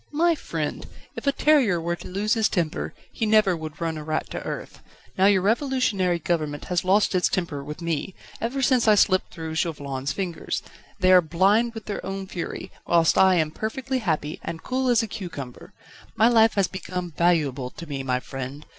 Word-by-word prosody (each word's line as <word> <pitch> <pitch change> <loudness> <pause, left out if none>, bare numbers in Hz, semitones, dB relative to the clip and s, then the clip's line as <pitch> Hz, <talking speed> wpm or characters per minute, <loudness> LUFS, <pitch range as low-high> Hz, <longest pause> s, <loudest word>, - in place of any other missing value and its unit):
"My 335 +3 +3
friend! 315 - -4 0.3
if - - -7
a - - +6
terrier 275 - +3
were 170 +1 -2
to - - -10
lose 205 +4 0
his 220 -2 +2
temper, 170 -5 -2 0.2
he 225 - -2
never 215 -4 +4
would 155 -2 -7
run 165 -2 -2
a - - -7
rat 155 +1 -3
to - - -4
earth. - - -6 0.4
Now 190 +1 +4
your 195 -2 +4
Revolutionary 220 -6 +1
Government 155 -3 -2
has 175 - +1
lost 195 +3 +3
its 180 -1 +2
temper 160 -6 -2
with 150 +4 -7
me, 170 +2 -2 0.3
ever 265 +4 -1
since 250 -2 +3
I 215 - +7
slipped 185 -2 +3
through 160 -2 -6
Chauvelin's 145 -4 -2
fingers; 175 0 -3 0.4
they 185 -1 +4
are 185 -1 +8
blind 195 +8 +2
with 225 - -7
their 205 - -4
own 195 0 -4
fury, 180 -3 -6 0.2
whilst 170 -2 +4
I 190 -1 +5
am 155 -3 +1
perfectly 260 - -3
happy 155 -9 -2
and 165 -1 -6
cool 260 0 -1
as 240 -2 +4
a - - -3
cucumber. 170 - -8 0.4
My 220 - +5
life 225 -2 +5
has 200 -2 +3
become 180 -2 -5
valuable 150 -7 +1
to 170 - -10
me, 140 -3 -4
my 130 -1 0
friend. 135 +3 -7
180 Hz, 195 wpm, -24 LUFS, 160-220 Hz, 0.4 s, are